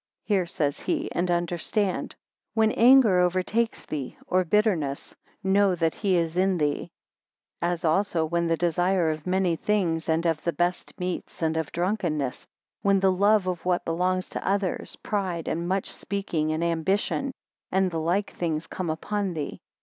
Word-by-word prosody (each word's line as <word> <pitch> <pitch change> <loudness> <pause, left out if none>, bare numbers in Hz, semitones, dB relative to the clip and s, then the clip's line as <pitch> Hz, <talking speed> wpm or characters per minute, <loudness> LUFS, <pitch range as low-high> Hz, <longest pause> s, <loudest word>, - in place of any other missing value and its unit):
Hear, 190 -4 +1
says 145 -4 -1
he, 320 -2 -2
and 175 +1 -1
understand; 175 +3 -1 0.4
When 220 -1 +4
anger 235 -6 +6
overtakes 185 +6 0
thee, 140 -4 -5
or 185 0 +2
bitterness, 175 -7 0 0.3
know 195 0 +3
that 165 -2 +1
he 195 -3 +1
is 165 0 0
in 190 0 +3
thee: 150 -2 -1 0.7
13 175 - +1
As 175 -1 -3
also, 165 0 +2
when 170 +1 0
the 165 0 +1
desire 175 0 +2
of 155 +2 -6
many 185 -2 +2
things, 170 -4 0
and 160 +1 +1
of 165 -2 0
the 170 - 0
best 175 +4 -2
meats, 180 -2 -4
and 160 0 +1
of 160 -2 -2
drunkenness; 170 -8 -1 0.3
when 200 -1 +3
the 190 0 +4
love 200 +2 +3
of 180 -2 -3
what 180 -1 0
belongs 180 +2 0
to - - -4
others, 195 -1 -1
pride, 185 -5 -3
and 170 +1 -2
much 190 +1 -1
speaking, 170 -6 -2
and 160 +2 -1
ambition; 190 - 0 0.4
and 190 0 +2
the 165 - -2
like 180 +5 0
things, 160 -2 -2
come 180 0 -4
upon 195 +3 -2
thee. 150 -2 -5
180 Hz, 165 wpm, -26 LUFS, 165-195 Hz, 0.7 s, anger